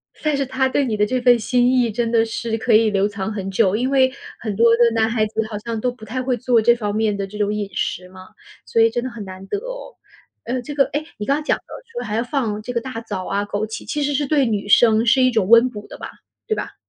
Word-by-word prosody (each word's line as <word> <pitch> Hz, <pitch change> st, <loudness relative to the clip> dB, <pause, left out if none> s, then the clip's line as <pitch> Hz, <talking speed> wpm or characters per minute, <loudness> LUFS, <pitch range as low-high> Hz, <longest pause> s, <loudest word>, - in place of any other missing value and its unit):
算 305 Hz, -2 st, -1 dB
是 275 Hz, -, -1 dB
他 265 Hz, 0 st, 0 dB
对 275 Hz, +1 st, +1 dB
你 225 Hz, -, -1 dB
的 210 Hz, 0 st, +2 dB
这 255 Hz, +4 st, -1 dB
份 245 Hz, -1 st, +5 dB
心 245 Hz, +2 st, +2 dB
意 245 Hz, -3 st, +2 dB
真 230 Hz, +1 st, -1 dB
的 225 Hz, -1 st, +4 dB
是 225 Hz, 0 st, -3 dB
可 225 Hz, 0 st, 0 dB
以 220 Hz, 0 st, +5 dB
留 200 Hz, -1 st, +1 dB
藏 200 Hz, 0 st, -4 dB
很 195 Hz, -2 st, -4 dB
久， 195 Hz, -1 st, +2 dB
因 250 Hz, +4 st, 0 dB
为 260 Hz, -1 st, +3 dB, 0.3 s
很 215 Hz, -3 st, -4 dB
多 230 Hz, +2 st, +5 dB
的 240 Hz, 0 st, +5 dB
男 225 Hz, 0 st, +2 dB
孩 225 Hz, -2 st, +1 dB
子 220 Hz, +1 st, -2 dB
好 210 Hz, -, -4 dB
像 225 Hz, +1 st, -4 dB
都 250 Hz, -, 0 dB
不 245 Hz, -3 st, -13 dB
太 255 Hz, +4 st, -3 dB
会 250 Hz, -1 st, 0 dB
做 240 Hz, -1 st, +2 dB
这 235 Hz, +2 st, +5 dB
方 210 Hz, -3 st, -3 dB
面 215 Hz, -1 st, +1 dB
的 195 Hz, -1 st, -3 dB
这 210 Hz, +2 st, -10 dB
种 205 Hz, 0 st, 0 dB
饮 210 Hz, -2 st, -3 dB
食 180 Hz, -, -2 dB
嘛， 185 Hz, 0 st, -13 dB, 0.4 s
所 230 Hz, -, +1 dB
以 225 Hz, -, +5 dB
真 240 Hz, +1 st, -3 dB
的 255 Hz, -, -3 dB
很 230 Hz, -4 st, -8 dB
难 190 Hz, 0 st, -10 dB
得 -, -, -2 dB
哦。 -, -, -8 dB, 0.5 s
呃， 250 Hz, +2 st, -2 dB
这 290 Hz, +4 st, -7 dB
个 275 Hz, -1 st, +3 dB
诶， 295 Hz, +2 st, -2 dB
你 210 Hz, -, -4 dB
刚 285 Hz, +5 st, 0 dB
讲 -, -, +1 dB
的 -, -, -22 dB, 0.3 s
说 480 Hz, +1 st, -5 dB
还 210 Hz, -, -3 dB
要 230 Hz, -, +1 dB
放 235 Hz, -6 st, -2 dB
这 245 Hz, -, -6 dB
个 235 Hz, -, 0 dB
大 235 Hz, -1 st, -6 dB
枣 185 Hz, -5 st, -5 dB
啊、 200 Hz, +1 st, -1 dB
枸 205 Hz, +1 st, -2 dB
杞， 220 Hz, +1 st, -7 dB
其 295 Hz, -, -3 dB
实 290 Hz, 0 st, 0 dB
是 290 Hz, +1 st, 0 dB
对 285 Hz, -2 st, +2 dB
女 210 Hz, -4 st, -2 dB
生 225 Hz, +1 st, +5 dB
是 260 Hz, +3 st, +4 dB
一 255 Hz, -, +4 dB
种 220 Hz, -4 st, 0 dB
温 235 Hz, +2 st, +7 dB
补 210 Hz, -4 st, -9 dB
的 -, -, -10 dB
吧， -, -, -8 dB, 0.4 s
对 435 Hz, -, 0 dB
吧？ -, -, -6 dB
230 Hz, 300 characters per minute, -20 LUFS, 210-255 Hz, 0.5 s, 温